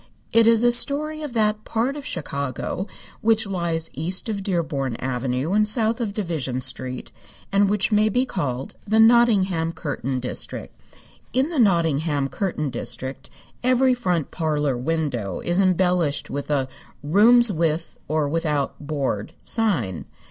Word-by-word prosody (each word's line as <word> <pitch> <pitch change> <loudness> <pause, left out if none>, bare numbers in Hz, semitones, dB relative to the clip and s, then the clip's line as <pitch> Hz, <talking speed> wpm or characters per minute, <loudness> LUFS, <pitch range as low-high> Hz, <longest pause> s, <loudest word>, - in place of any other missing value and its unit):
It 230 0 +5
is 230 0 +5
a 240 - +5
story 305 +5 +1
of 295 -5 -6
that 215 -2 +1
part 240 +5 -1
of 290 -1 -7
Chicago 140 - -3 0.3
which 225 0 +2
lies 170 -4 -2
east 180 - -2
of 205 -2 -2
Dearborn 155 - -1
Avenue 130 +5 -2
and 210 0 +3
south 225 +1 +1
of 220 -4 -1
Division 160 - -2
Street, 130 0 0 0.4
and 200 0 +3
which 205 +1 +1
may 215 +1 +4
be 250 +5 +1
called 135 - -3
the 220 +2 +3
Nottingham 200 -8 +4
curtain 135 -4 -3
district. 125 - -4 0.6
In 265 +4 +2
the 325 -5 -2
Nottingham 160 - +2
curtain 155 -4 -2
district 130 +2 -5 0.3
every 255 +1 +4
front 180 - -1
parlor 150 -5 0
window 125 - -2
is 175 +3 +1
embellished 180 -5 +1
with 140 +1 -4
a 140 -3 +1 0.4
"Rooms 220 +9 +5
With 165 -1 -1
or 155 -1 0
Without 150 -2 -1
Board" 140 -8 -3
sign. 165 - 0
170 Hz, 140 wpm, -23 LUFS, 140-220 Hz, 0.6 s, It